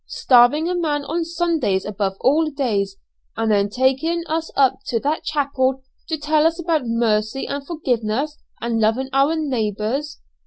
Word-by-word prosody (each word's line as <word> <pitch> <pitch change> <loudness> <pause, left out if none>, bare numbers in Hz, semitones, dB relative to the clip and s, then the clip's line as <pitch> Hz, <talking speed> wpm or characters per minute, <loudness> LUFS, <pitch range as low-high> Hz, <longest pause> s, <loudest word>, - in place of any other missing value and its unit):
Starving 255 +6 +4
a 360 - 0
man 300 -5 -1
on 330 +4 -1
Sundays 330 - 0
above 195 -2 -2
all 305 +4 +3
days, 215 -9 -1 0.4
and 225 -1 +1
then 200 -1 +2
taking 265 +9 +1
us 320 0 -2
up 270 -2 +3
to 230 - 0
that 300 +3 -1
chapel 270 -3 0 0.3
to 320 - -1
tell 305 +1 +2
us 335 +1 -2
about 320 -6 0
mercy 230 +1 0
and 280 0 -5
forgiveness 275 -2 -2 0.2
and 235 -1 -1
loving 225 +5 +1
our 275 +4 +3
neighbours! 260 0 -2
275 Hz, 155 wpm, -21 LUFS, 225-310 Hz, 0.4 s, Starving